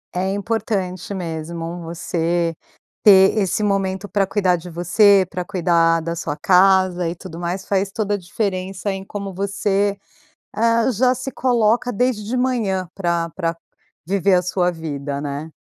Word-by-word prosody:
É 185 +2 0
importante 200 -3 -2
mesmo 165 0 -5
você 170 0 -1 0.5
ter 190 -1 +7
esse 210 0 0
momento 195 -1 -1
pra 200 -1 0
cuidar 190 -3 +2
de 175 +2 -10
você, 190 +3 +4
pra 180 -1 -4
cuidar 170 -3 +2
da 170 +1 -3
sua 155 -3 -4
casa, 185 0 +3
e 170 - -5
tudo 165 -1 -10
mais. 175 +2 -3
Faz 195 0 0
toda 205 0 -1
a - - +1
diferença 190 +1 -3
em 190 0 -6
como 200 0 -6
você, 200 +1 0 0.6
ah, 230 +2 +2
já 250 +3 +2
se 255 +1 -5
coloca 240 -1 +2
desde 245 -1 0
de 250 +4 -2
manhã 215 -8 0
pra 170 -3 -1
pra 165 -2 -1 0.5
viver 195 0 +2
a 180 - +3
sua 180 0 0
vida, 145 -4 -5
né? 145 +2 -5
190 Hz, 155 wpm, -20 LUFS, 170-205 Hz, 0.6 s, ter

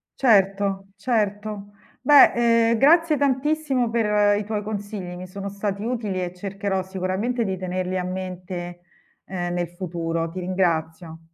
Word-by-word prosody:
Certo, 195 -4 +2
certo. 205 -2 -2 0.3
Beh, 235 -4 +6
ehm, 230 - +2
grazie 320 +1 +5
tantissimo 275 -2 +1
per 210 -3 +3
i - - -3
tuoi 210 -1 -3
consigli, 205 -3 -5
mi 185 +1 -8
sono 195 +2 -7
stati 200 0 -3
utili 220 -6 -2
e 175 - -5
cercherò 195 +1 -3
sicuramente 190 +6 -2
di 190 -3 -2
tenerli 185 0 -3
a 180 - -2
mente, 180 -1 -6 0.4
uhm, 175 -2 -3
nel 175 -1 -2
futuro. 165 -2 -3
Ti 185 - -6
ringrazio. 165 -3 -1
195 Hz, 140 wpm, -23 LUFS, 180-225 Hz, 0.4 s, Beh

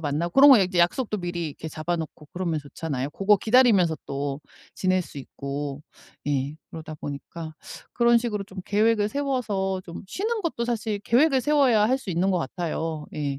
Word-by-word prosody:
만나고 160 +3 -2
그런 285 +1 +10
거 260 - +9 0.2
약속도 210 +5 +1
미리 175 -2 -3
이렇게 155 +2 -8
잡아 160 +3 -2
놓고 155 -2 -7
그러면 175 -4 -1
좋잖아요. 145 -1 -4
고거 200 +5 +3
기다리면서 215 -9 +4
또 140 0 -3 0.3
지낼 185 -1 +1
수 145 - -10
있고. 140 +1 -5 0.5
예. 140 0 -1 0.2
그러다 155 -1 -8
보니까 155 +3 -7 0.4
그런 235 0 +5
식으로 210 -4 -3
좀 190 -1 -13
계획을 210 0 +2
세워서 215 -9 -1
좀 170 +3 -8
쉬는 430 - -2
것도 305 -8 -2
사실 220 -3 -2
계획을 265 +6 +3
세워야 255 -7 +3
할 260 - +3
수 200 - -7
있는 180 +3 +1
것 185 - +2
같아요. 160 -1 -3
예. 140 -2 -2
185 Hz, 355 characters per minute, -25 LUFS, 155-230 Hz, 0.5 s, 그런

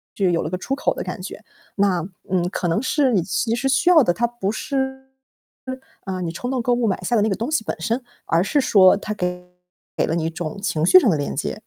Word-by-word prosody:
就 195 -3 +1
有 170 -1 +1
了 155 - -3
个 185 - -2
出 270 +9 -4
口 280 - 0
的 - - -5
感 - - -6
觉。 - - -8 0.3
那， 195 -4 +2 0.3
嗯， 180 -2 +1
可 175 - -2
能 165 +8 +1
是 265 -1 +1
你 190 - +3
其 220 +5 -1
实 270 +3 -1
需 275 +6 +3
要 330 -4 +7
的， 175 - +2
它 235 - 0
不 225 -4 -3
是， 265 0 -3 1.0
嗯， 185 -2 -3
你 165 - -3
冲 245 +9 -5
动 255 -2 -1
购 245 +1 +1
物 240 -2 +1
买 190 - 0
下 235 - 0
的 - - +3
那 215 - +2
个 195 - 0
东 235 +9 -4
西 245 - +1
本 - - -2
身， 230 +9 -1 0.2
而 165 - +2
是 285 +7 +1
说 190 -7 +6
它 210 +1 -4
给 180 -2 -3 0.6
了 160 - -1
你 160 - -1
一 - - 0
种 165 0 -5
情 180 -6 0
绪 275 - +8
上 245 - +2
的 160 - +2
连 145 - -3
接。 150 - -3
200 Hz, 275 characters per minute, -22 LUFS, 180-245 Hz, 1.0 s, 绪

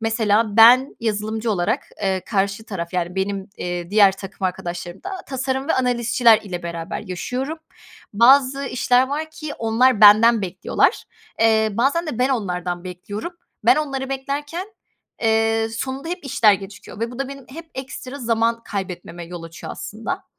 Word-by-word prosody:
mesela 220 -1 +1
ben 250 +4 +7
yazılımcı 220 0 -2
olarak, 215 +7 0 0.2
eee, 190 -1 0
karşı 200 +1 -1
taraf, 180 -5 -6
yani, 180 0 -2
benim, 195 +1 -2
eee, 175 0 -4
diğer 205 -2 +6
takım 195 0 -8
arkadaşlarım 175 0 -6
da 390 - -4 0.2
tasarım 265 +1 -2
ve - - +3
analistçiler 240 -2 +3
ile 180 -4 -6
beraber 170 -1 -5
yaşıyorum. 255 - -4 0.5
Bazı 265 +5 +5
işler 250 0 +2
var 310 +3 -3
ki, 310 -2 -7
onlar 230 +1 +2
benden 215 +1 +7
bekliyorlar. 185 0 0 0.4
Eee, 220 -1 +4
bazen 280 - +1
de 250 -6 -4
ben 255 - +2
onlardan 180 -7 -2
bekliyorum. 205 - -6 0.3
Ben - - +6
onları 270 -3 -2
beklerken, 290 +7 -4 0.6
eee, 225 0 +2
sonunda 260 +6 -5
hep 355 -3 -5
işler 225 -5 +4
gecikiyor 195 +2 -7
ve 230 +1 -2
bu 245 - -10
da 275 - -2
benim 275 -1 -9
hep 325 +4 -10
ekstra 260 +1 -7
zaman 230 -1 0
kaybetmeme 180 -3 -6
yol 175 -1 -8
açıyor 165 0 -8
aslında. 220 +2 -5
225 Hz, 155 wpm, -21 LUFS, 195-260 Hz, 0.6 s, ben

